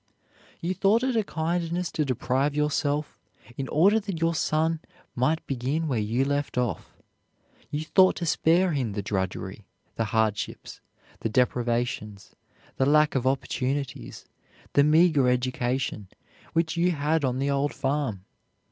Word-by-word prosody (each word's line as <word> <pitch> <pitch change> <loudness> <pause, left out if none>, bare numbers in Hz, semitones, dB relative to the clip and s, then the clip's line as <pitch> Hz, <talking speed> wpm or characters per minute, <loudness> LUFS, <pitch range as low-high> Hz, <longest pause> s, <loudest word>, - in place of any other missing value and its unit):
You 175 +2 -1
thought 205 +6 +2
it 260 -2 0
a 220 - +2
kindness 170 0 -2
to 155 - 0
deprive 135 +2 0
yourself 150 0 -1 0.4
in 135 0 -4
order 200 +8 +4
that 195 -5 -5
your 165 0 +1
son 160 +1 0 0.3
might 145 +6 0
begin 135 +5 -2
where 125 -6 0
you 115 +5 0
left 145 -1 -2
off. 120 -8 -2 0.7
You 150 +2 -3
thought 185 +3 +5
to 175 - -3
spare 170 +3 +3
him 130 -8 -1
the 100 0 -3
drudgery, 95 0 -4 0.3
the 115 - 0
hardships, 110 -1 -2 0.4
the 115 - -2
deprivations, 120 -3 -1 0.4
the 135 - +2
lack 150 +1 +4
of 130 -1 0
opportunities, 135 0 -2 0.5
the 140 - +5
meager 155 -3 +4
education, 125 -3 -1 0.5
which 165 +1 +1
you 175 +1 +2
had 155 +1 0
on 130 -1 0
the 140 +1 0
old 140 +1 +1
farm. 135 -9 -2
140 Hz, 140 wpm, -26 LUFS, 125-160 Hz, 0.7 s, thought